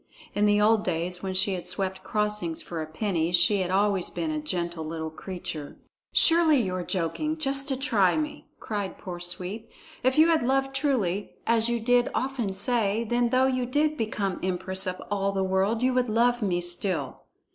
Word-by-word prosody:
In 210 0 +2
the 205 0 +4
old 215 0 +4
days 180 +1 -2
when 190 -1 -3
she 190 +1 +2
had 180 -1 -5
swept 190 +1 0
crossings 210 -5 -1
for 165 -2 -5
a 155 - -5
penny 165 0 -1
she 180 +3 +4
had 185 -2 -1
always 195 -1 +2
been 320 - -3
a 310 - -2
gentle 175 - -3
little 160 0 -5
creature. 160 -3 -7 0.3
"Surely 325 -4 +5
you 190 -6 -1
are 185 - -2
joking, 200 - -2
just 275 -2 0
to 270 -2 -1
try 220 - +2
me," 300 -1 -4
cried 205 -3 -4
poor 180 -2 -7
Sweep. 180 +6 -6 0.3
"If 260 +2 +1
you 320 +2 +6
had 325 -1 +3
loved 270 +2 +1
truly, 230 - -1
as 230 0 +2
you 235 0 0
did 245 +1 +3
often 255 -6 -1
say, 220 +1 +1
then 240 +1 +1
though 255 +1 +3
you 255 -2 0
did 300 +4 +1
become 210 -6 -2
empress 190 +1 -2
of 185 0 -3
all 200 -1 0
the 195 -1 0
world, 190 +5 +1
you 255 0 +3
would 250 -2 +1
love 240 +2 +2
me 180 -4 0
still. 175 +1 0
205 Hz, 190 wpm, -26 LUFS, 185-250 Hz, 0.3 s, you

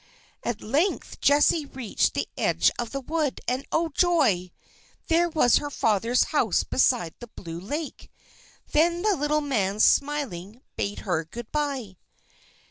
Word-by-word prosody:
At 240 -2 -3
length 305 - -1
Jessie 295 +1 +3
reached 255 -6 -1
the - - -1
edge - - +2
of 240 -2 -2
the 275 - -4
wood, 305 0 -2
and, 255 +2 -2
oh, 330 0 +1
joy! 285 - +2 0.6
there 340 +1 +3
was 305 -7 +4
her 290 - -3
father's 230 -1 +2
house 235 - +2
beside 240 -10 +1
the 240 - -9
blue 170 -6 -8
lake. 290 - -6 0.6
Then 340 +3 +2
the 420 -2 +3
little 300 0 0
man, 210 -8 -1
smiling, 250 -7 +1
bade 200 +1 -3
her 175 -5 -1
good 225 +8 -10
bye. 275 - -3
265 Hz, 140 wpm, -25 LUFS, 210-300 Hz, 0.6 s, was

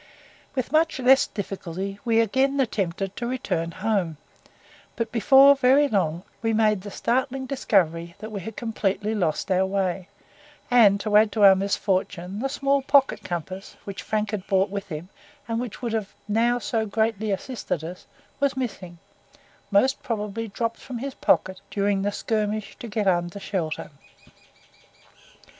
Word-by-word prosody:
With 255 -3 -2
much 315 0 +2
less 260 +1 +5
difficulty 195 -1 -5
we 230 -2 +3
again 265 +5 +1
attempted 195 -5 -1
to 235 - -3
return 235 -10 -2
home, 185 -3 -1 0.8
but 230 -1 -3
before 270 +4 +7
very 275 +2 +4
long 180 - 0 0.2
we 225 -1 0
made 215 -2 +2
the 205 - -8
startling 260 +5 -1
discovery 170 - 0
that 215 +2 -8
we 200 -2 -4
had 220 +4 -7
completely 215 -2 -1
lost 180 -1 -1
our 185 0 +3
way, 190 -1 -1 0.6
and 210 -5 +6
to 210 0 -1
add 215 0 +5
to 215 - +1
our 195 -1 +10
misfortune 190 -1 -1
the 270 +3 -1
small 275 0 +1
pocket 275 0 +3
compass, 185 +3 -6
which 195 -1 -6
Frank 215 -1 -1
had 205 -3 -4
brought 195 0 +2
with 200 -1 -4
him, 165 0 -7 0.4
and 230 0 -1
which 245 0 -6
would 235 -2 -2
have 215 -3 -2 0.2
now 230 +3 +2
so 225 -2 -1
greatly 220 0 0
assisted 195 - -3
us, 175 +3 -8 0.3
was 280 -2 +1
missing, 195 -9 -5 0.7
most 255 +7 +3
probably 225 -3 -3
dropped 230 +3 -3
from 255 -2 -7
his 270 +3 -5
pocket 185 -6 +1
during 200 -1 0
the 205 +1 0
skirmish 215 0 -2
to 235 - -7
get 210 -1 -2
under 175 +1 0
shelter. 170 -6 -3
210 Hz, 155 wpm, -25 LUFS, 190-240 Hz, 0.8 s, our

